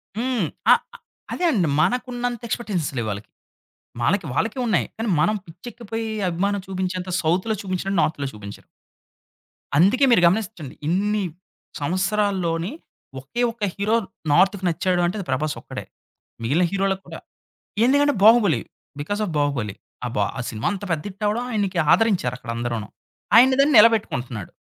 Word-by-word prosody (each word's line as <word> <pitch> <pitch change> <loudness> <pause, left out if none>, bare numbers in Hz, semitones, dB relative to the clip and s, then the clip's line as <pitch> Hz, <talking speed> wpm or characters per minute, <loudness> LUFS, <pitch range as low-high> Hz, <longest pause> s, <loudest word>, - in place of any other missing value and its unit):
హ్మ్. 240 -3 0 0.3
అ! - - +11 0.6
అదే 360 - -1
అండి 190 - +1
మనకు 250 +7 +1
ఉన్నంత 245 -1 -3
ఎక్స్‌పెక్టేషన్స్ 210 -9 -2
లేవు 115 -2 -1
వాళ్ళకి. 100 +1 -7 0.7
మనకి 185 - +1
వాళ్ళకి 220 - -1
ఉన్నాయి. 215 -6 +2
కానీ 225 0 -2
మనం 215 +7 +2
పిచ్ఛేక్కిపోయే 225 +5 -7 0.2
అభిమానం 200 +4 -1
చూపించేంత 185 -1 -3
సౌత్‌లో 185 +7 +1
చూపించేంత 190 +1 -2
నార్త్‌లో 145 -3 -1
చూపించరు. 105 -1 -10 1.1
అందుకే 205 - +5
మీరు 230 - +5
గమనించండి, 190 - -2
ఇన్ని 205 +4 +1 0.6
సంవత్సరాల్లోని, 185 0 0 0.5
ఒకే 135 - -5
ఒక్క 225 -1 -9
హీరో 210 +3 +1 0.4
నార్తుకి 190 +5 +3
నచ్చాడు 175 +2 0
అంటే, 180 +5 -1
అది 195 - -5
ప్రభాస్ 150 +4 -1
ఒక్కడే. - - -7 0.6
మిగిలిన 150 +10 +2
హీరోలకి 195 -1 0
కూడా. - - -8 0.7
ఎందుకంటే, 285 +2 +3
'బాహుబలి', 215 -6 +5 0.4
బికాస్ 205 +8 -3
ఆఫ్ 175 - -5
'బాహుబలి.' 135 -9 -1 0.3
అబ్బా! 120 +2 0
ఆ - - -2
సినిమా 110 0 -3
అంత 195 - -6
పెద్ద 155 -2 -1
హిట్టవ్వడం, 210 +4 -1
ఆయనకి 200 -5 -1
ఆదరించారక్కడ 130 - 0
అందరూను. 120 -3 -3 0.5
ఆయన 255 +3 +7
దాన్ని 285 0 +3
నిలబెట్టుకుంటున్నాడు. 130 - +2
195 Hz, 135 wpm, -23 LUFS, 155-220 Hz, 1.1 s, అ